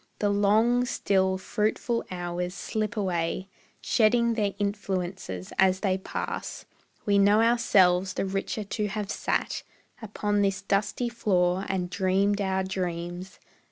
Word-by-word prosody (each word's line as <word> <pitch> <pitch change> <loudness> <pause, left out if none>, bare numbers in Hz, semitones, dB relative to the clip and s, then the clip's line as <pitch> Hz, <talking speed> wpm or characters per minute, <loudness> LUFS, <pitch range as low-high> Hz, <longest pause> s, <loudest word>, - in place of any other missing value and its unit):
The 205 -1 +1
long, 215 +5 +3
still, 190 -5 +1
fruitful 215 +4 -1
hours 180 0 -4
slip 215 +3 -3
away 185 -1 -1 0.3
Shedding 235 +1 +3
their 205 -3 -1
influences 190 - -3
as 190 0 +4
they 190 -2 +1
pass; - - -5 0.4
We 200 -1 +3
know 205 +2 +5
ourselves 195 -6 +3
the - - -1
richer 195 +2 -3
to 210 +1 -2
have 205 0 -4
sat - - -1 0.4
Upon 205 -1 -1
this 195 -1 0
dusty 210 +5 0
floor 190 -5 +1
and 185 -2 -1
dreamed 200 +2 +1
our 190 -1 0
dreams. 180 -1 -4
195 Hz, 125 wpm, -27 LUFS, 185-210 Hz, 0.4 s, know